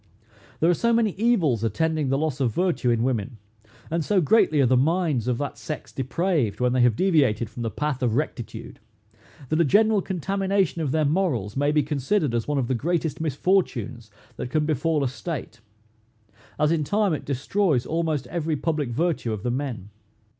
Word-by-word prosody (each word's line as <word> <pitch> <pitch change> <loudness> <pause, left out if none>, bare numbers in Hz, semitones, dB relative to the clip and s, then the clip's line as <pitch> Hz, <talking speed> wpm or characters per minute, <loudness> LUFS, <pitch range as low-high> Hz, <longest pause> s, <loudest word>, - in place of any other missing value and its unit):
There 165 - +4
are - - +4
so 235 +7 +1
many 230 -2 +2
evils 185 - +1
attending 155 +6 0
the 135 - +2
loss 150 -2 -2
of 125 -4 +1
virtue 175 -8 +1
in 115 -1 +2
women, 125 -1 -2 0.5
and 165 0 0
so 200 +4 +2
greatly 160 -3 +3
are 135 - +5
the 130 +1 +3
minds 150 -3 +1
of 125 -2 +1
that 145 +1 -4
sex 155 - -6
depraved 130 - -1
when 125 0 +2
they 130 - +2
have 120 -3 +4
deviated 135 - +2
from 120 - -7
the 115 - -1
path 150 +2 -3
of 120 -3 +1
rectitude, 130 -4 -4 0.7
that 155 +2 +2
a - - +6
general 210 +6 +3
contamination 195 -1 -1
of 150 - -1
their 155 +2 +1
morals 140 - 0
may 145 +1 +1
be 150 -1 +2
considered 150 - 0
as 115 -1 -1
one 145 -1 0
of 130 -3 0
the 130 - 0
greatest 160 +4 -1
misfortunes 130 - -1 0.3
that - - -4
can 155 +2 +1
befal 155 0 0
a - - +1
state, 130 -3 -6 1.0
as 150 +1 +2
in 165 -2 +1
time 205 +3 +1
it 155 - -3
destroys 140 0 0
almost 160 -4 -1
every 165 -2 -2
public 150 -3 -1
virtue 150 -2 -1
of 105 -2 -4
the 120 - 0
men. 120 -7 -4
150 Hz, 190 wpm, -24 LUFS, 125-170 Hz, 1.0 s, a